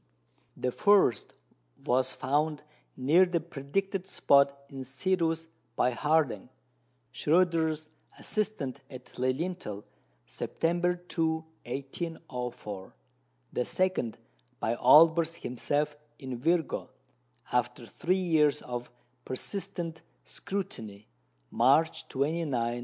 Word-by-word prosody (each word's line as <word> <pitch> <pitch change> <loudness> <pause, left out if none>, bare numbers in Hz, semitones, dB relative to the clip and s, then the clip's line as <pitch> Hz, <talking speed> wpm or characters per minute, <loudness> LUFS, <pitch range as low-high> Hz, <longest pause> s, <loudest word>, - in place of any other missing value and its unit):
The 125 - -1
first 195 - +3 0.5
was 130 +1 +2
found 150 +2 0 0.3
near 150 +8 +5
the 175 -2 +1
predicted 180 +5 -3
spot 140 -5 +4
in 135 -1 -7
Cetus 165 +5 0 0.3
by 125 - +3
Harding, 150 +3 +1 0.6
Schröter's 160 -2 +2 0.3
assistant 210 - -2
at 130 -2 -11
Lilienthal, 130 - -2 0.4
September 175 - 0
2, 160 -2 -1 0.2
1804; 125 - -5 0.6
the 125 - +1
second 185 -11 0 0.4
by 115 - 0
Olbers 160 +6 +6
himself 145 +3 -1 0.2
in 130 -4 -6
Virgo, 165 +4 0 0.6
after 125 +1 0
three 180 +10 0 0.2
years 150 -2 +3
of 125 0 -5 0.3
persistent 170 +3 -4 0.2
scrutiny, 110 - -5 0.4
March 160 0 +3
29, 155 +5 -1
1807. 120 -2 0
150 Hz, 90 wpm, -29 LUFS, 130-170 Hz, 0.6 s, Olbers